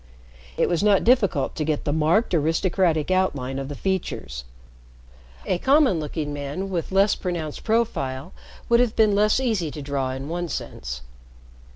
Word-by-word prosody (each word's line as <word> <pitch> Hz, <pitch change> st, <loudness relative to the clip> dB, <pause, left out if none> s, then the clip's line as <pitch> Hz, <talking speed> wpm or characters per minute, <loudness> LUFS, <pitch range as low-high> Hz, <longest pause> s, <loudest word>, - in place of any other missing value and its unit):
It -, -, +3 dB
was 175 Hz, 0 st, 0 dB
not 205 Hz, -2 st, +4 dB
difficult 200 Hz, -, +2 dB
to 155 Hz, -, -1 dB
get 150 Hz, -1 st, -1 dB
the 145 Hz, -, 0 dB
marked, 160 Hz, +8 st, +2 dB
aristocratic 165 Hz, +1 st, +1 dB
outline 140 Hz, -8 st, 0 dB
of 135 Hz, -, -4 dB
the 145 Hz, -, -5 dB
features. 135 Hz, -, -3 dB, 1.0 s
A 175 Hz, -, 0 dB
common 270 Hz, -, +4 dB
looking 150 Hz, -1 st, -4 dB
man 145 Hz, +7 st, -4 dB
with 175 Hz, -1 st, -3 dB
less 195 Hz, +2 st, +4 dB
pronounced 170 Hz, -5 st, -4 dB
profile 180 Hz, -, -1 dB, 0.3 s
would 235 Hz, 0 st, +4 dB
have 245 Hz, -3 st, +2 dB
been 215 Hz, -2 st, +4 dB
less 210 Hz, +4 st, +3 dB
easy 220 Hz, -11 st, 0 dB
to 150 Hz, -, -7 dB
draw 140 Hz, -2 st, -2 dB
in 135 Hz, +2 st, -5 dB
one 175 Hz, +2 st, -3 dB
sense. 60 Hz, -, -5 dB
170 Hz, 160 wpm, -24 LUFS, 145-200 Hz, 1.0 s, not